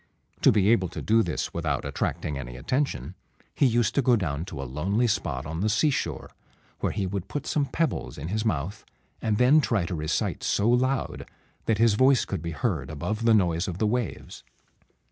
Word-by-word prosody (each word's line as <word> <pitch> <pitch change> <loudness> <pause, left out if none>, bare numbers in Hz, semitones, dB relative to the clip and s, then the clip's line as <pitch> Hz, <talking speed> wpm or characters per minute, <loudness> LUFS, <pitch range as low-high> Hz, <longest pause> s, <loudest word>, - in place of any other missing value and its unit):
To - - +6
be 105 -1 +3
able 95 -6 +3
to - - -7
do 115 +1 +4
this 85 -7 -2
without 75 -5 -2
attracting 75 - -2
any 60 -2 -6
attention, 90 - -2 0.4
he 140 - +3
used 120 -3 +2
to 140 - +2
go 125 -1 +4
down 80 -6 -2
to 80 -7 -8
a - - -3
lonely 90 - 0
spot 100 - -1
on 80 +2 -4
the 105 - +1
seashore, 135 +7 0 0.5
where - - 0
he 100 - -2
would 95 0 -4
put 145 - -4
some 145 -2 0
pebbles 155 +1 -2
in 75 - -5
his 110 +2 -1
mouth, 100 -2 -2 0.4
and 105 -2 0
then 130 +6 +5
try 110 -10 0
to 90 - -4
recite 75 -2 -1
so 105 - +1
loud 130 +2 0 0.4
that 110 - +2
his 115 0 +4
voice 130 +4 +4
could - - -4
be 85 - -4
heard 80 -2 -2
above 100 +9 -3
the 115 - +6
noise 85 -4 +1
of 90 -2 -4
the 110 - +1
waves. 120 +1 -3
100 Hz, 200 wpm, -26 LUFS, 80-120 Hz, 0.5 s, To